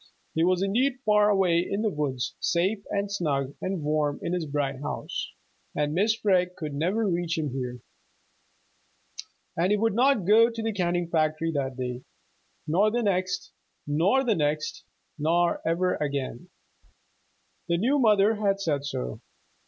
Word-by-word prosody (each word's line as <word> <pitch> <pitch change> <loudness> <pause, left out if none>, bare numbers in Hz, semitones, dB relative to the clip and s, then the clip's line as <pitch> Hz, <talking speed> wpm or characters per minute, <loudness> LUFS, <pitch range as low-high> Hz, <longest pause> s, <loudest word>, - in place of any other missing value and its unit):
He 160 - +1
was 185 +1 +2
indeed 245 +7 +1
far 210 -1 +4
away 190 -4 +3
in 195 +4 -2
the 215 - +1
woods, 140 -6 -2
safe 190 +4 0
and 200 0 -2
snug 140 -8 -1
and 185 -4 -3
warm 150 -1 0
in - - -2
this 180 -2 -1
bright 140 -2 -2
house, 145 - -4 0.4
and 150 +1 0
Mrs. 215 +4 +2
Freg 180 -3 +2
could 155 -3 -5
never 185 +10 0
reach 170 -2 -1
him 150 -4 -2
here. 125 -2 -5 1.7
And 170 +3 +1
he 210 - +3
would 225 +1 +1
not 250 -3 +3
go 225 +4 +6
to 230 -1 -5
the 225 0 -1
canning 175 -2 0
factory 160 0 0
that 135 -4 -2
day, 125 -1 -4 0.6
nor 190 +8 +3
the 240 +2 -1
next, 185 -2 -1 0.3
nor 175 - +2
the 240 -4 +2
next, 155 -2 -1 0.3
nor 170 +3 +2
ever 180 +2 +1
again. 140 -4 -3 1.2
The 170 -1 +1
new 260 +10 +2
mother 215 -3 +4
had 200 -2 +1
said 150 -7 -1
so. 60 - -4
175 Hz, 155 wpm, -26 LUFS, 150-205 Hz, 1.7 s, go